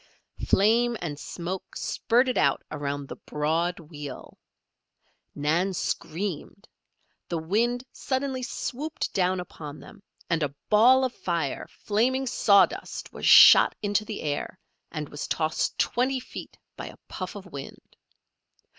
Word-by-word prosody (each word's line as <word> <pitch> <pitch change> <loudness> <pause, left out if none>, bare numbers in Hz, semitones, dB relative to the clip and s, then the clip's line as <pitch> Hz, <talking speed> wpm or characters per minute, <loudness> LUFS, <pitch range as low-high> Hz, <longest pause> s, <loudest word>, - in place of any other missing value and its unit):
Flame 230 +4 +3
and 150 -4 -5
smoke 180 +4 -6
spurted 250 +2 +1
out 140 -2 +2
around 145 -1 -4
the - - -8
broad 165 +4 -1
wheel. 150 -4 -9 1.0
Nan 170 +6 +1
screamed. 180 +4 -4 0.6
The 170 - -1
wind 230 +10 0
suddenly 260 -1 -2
swooped 285 +4 -4
down 185 0 +1
upon 155 -4 -8
them, 220 -5 -14 0.3
and 165 -1 0
a 145 -1 -2 0.2
ball 250 +5 +6
of 255 - -3
fire, 170 -6 -3
flaming 255 +6 0
sawdust 200 -5 +2
was - - -3
shot - - +9
into 205 +1 +1
the 215 0 -6
air 150 +4 -3 0.3
and 150 -2 -4
was 145 +1 -6
tossed 155 -1 -1
twenty 260 +2 +1
feet 250 - -10 0.2
by - - -7
a - - -11
puff 185 +1 -6
of 200 -1 -8
wind. 140 -7 -10
185 Hz, 130 wpm, -26 LUFS, 155-235 Hz, 1.0 s, shot